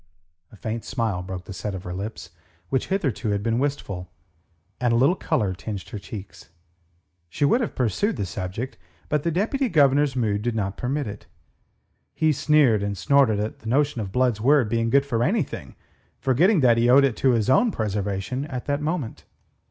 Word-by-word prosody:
A -, -, -14 dB
faint 110 Hz, +2 st, -4 dB
smile 115 Hz, -8 st, -2 dB
broke 90 Hz, 0 st, -7 dB
the -, -, -8 dB
set 100 Hz, +2 st, -4 dB
of 95 Hz, -, -7 dB
her 90 Hz, -, -5 dB
lips, 95 Hz, -2 st, -6 dB, 0.4 s
which 130 Hz, -2 st, 0 dB
hitherto 150 Hz, -, -1 dB
had 100 Hz, 0 st, -1 dB
been 115 Hz, +1 st, +1 dB
wistful, 100 Hz, -11 st, -3 dB, 0.7 s
and 125 Hz, -2 st, +1 dB
a -, -, +3 dB
little 135 Hz, +8 st, +4 dB
colour 100 Hz, -, 0 dB
tinged 100 Hz, +1 st, -6 dB
her 105 Hz, -, -6 dB
cheeks. 100 Hz, -4 st, -10 dB, 0.8 s
She 145 Hz, -, 0 dB
would 235 Hz, -, +3 dB
have 230 Hz, -, -3 dB
pursued 135 Hz, -, 0 dB
the 100 Hz, -, -2 dB
subject, 95 Hz, +7 st, -5 dB, 0.3 s
but 150 Hz, -1 st, +1 dB
the 170 Hz, -, 0 dB
Deputy 230 Hz, -, 0 dB
Governor's 145 Hz, -4 st, +3 dB
mood 105 Hz, -5 st, 0 dB
did 120 Hz, +1 st, -2 dB
not 100 Hz, -3 st, -2 dB
permit 140 Hz, +3 st, -2 dB
it. 105 Hz, -1 st, -8 dB, 0.9 s
He 155 Hz, -1 st, +3 dB
sneered 140 Hz, -7 st, +3 dB
and 100 Hz, -1 st, -2 dB
snorted 110 Hz, +2 st, +3 dB
at 105 Hz, +1 st, -3 dB
the 110 Hz, -, -7 dB
notion 140 Hz, -1 st, +1 dB
of 100 Hz, -3 st, -5 dB
Blood's 125 Hz, -2 st, +1 dB
word 135 Hz, -2 st, +4 dB
being 115 Hz, 0 st, 0 dB
good 140 Hz, +3 st, +4 dB
for 115 Hz, -5 st, -1 dB
anything, 190 Hz, -, -2 dB, 0.4 s
forgetting 160 Hz, -, +3 dB
that 120 Hz, -3 st, +5 dB
he 120 Hz, +1 st, +3 dB
owed 135 Hz, +3 st, +7 dB
to 135 Hz, 0 st, +2 dB
it -, -, +3 dB
his 110 Hz, -3 st, 0 dB
own 235 Hz, -, +4 dB
preservation 105 Hz, -, -2 dB
at 130 Hz, -4 st, -6 dB
that 145 Hz, 0 st, -1 dB
moment. 150 Hz, -6 st, -3 dB
120 Hz, 190 wpm, -24 LUFS, 105-140 Hz, 0.9 s, owed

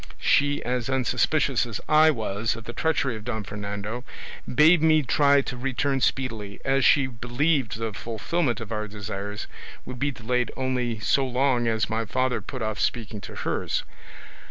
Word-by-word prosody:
She, 145 Hz, 0 st, +2 dB
as 125 Hz, 0 st, -1 dB
unsuspicious 130 Hz, 0 st, +1 dB
as 115 Hz, -, -4 dB
I 155 Hz, +1 st, +6 dB
was 110 Hz, -5 st, -1 dB
of 115 Hz, -, -9 dB
the 120 Hz, -, -7 dB
treachery 140 Hz, -6 st, 0 dB
of 110 Hz, -, -8 dB
Don 110 Hz, -2 st, -3 dB
Fernando, 105 Hz, +3 st, -5 dB, 0.5 s
bade 155 Hz, +5 st, +6 dB
me 155 Hz, -1 st, +4 dB
try 140 Hz, +2 st, +4 dB
to 130 Hz, -, -5 dB
return 135 Hz, +2 st, -1 dB
speedily, 115 Hz, -7 st, -1 dB
as 135 Hz, 0 st, +2 dB
she 135 Hz, +1 st, +5 dB
believed 125 Hz, +2 st, 0 dB
the 115 Hz, -1 st, -3 dB
fulfilment 120 Hz, -, -2 dB
of 115 Hz, -2 st, -8 dB
our 105 Hz, -1 st, -2 dB
desires 105 Hz, 0 st, -5 dB, 0.4 s
would 125 Hz, -1 st, -7 dB
be 140 Hz, +2 st, +1 dB
delayed 125 Hz, -1 st, -1 dB
only 125 Hz, -3 st, -1 dB
so 110 Hz, +7 st, +2 dB
long 125 Hz, -1 st, +1 dB
as 110 Hz, -1 st, +1 dB
my 115 Hz, 0 st, -1 dB
father 130 Hz, +3 st, 0 dB
put 130 Hz, -4 st, -6 dB
off 110 Hz, -1 st, -2 dB
speaking 110 Hz, -3 st, -2 dB
to -, -, -9 dB
hers. -, -, -2 dB
125 Hz, 165 wpm, -25 LUFS, 110-135 Hz, 0.5 s, I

